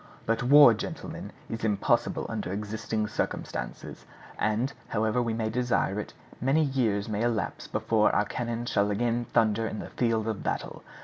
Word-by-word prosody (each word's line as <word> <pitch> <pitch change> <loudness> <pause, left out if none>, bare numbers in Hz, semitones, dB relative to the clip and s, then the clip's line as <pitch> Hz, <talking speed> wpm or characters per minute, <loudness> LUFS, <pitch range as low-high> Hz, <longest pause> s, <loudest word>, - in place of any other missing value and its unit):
_) - - -24
"But 115 0 +1
war, 140 0 +8
gentlemen, 105 - -6 0.2
is 115 0 -5
impossible 105 -3 +1
under - - -4
existing 105 +2 -2
circumstances; - - -4 0.4
and, 110 +6 0
however 110 +2 +1
we 115 -2 -1
may 110 -1 -1
desire 120 -4 0
it, 105 - -7 0.3
many 135 +6 +3
years 120 -8 0
may 105 -1 -2
elapse 115 -8 -1
before - - +2
our - - +2
cannon 120 -1 -3
shall 100 -3 +1
again 120 +3 0
thunder 110 -1 +2
in 110 - -5
the - - -7
field 115 -2 0
of 110 -3 -2
battle. - - -3
115 Hz, 165 wpm, -28 LUFS, 105-120 Hz, 0.4 s, war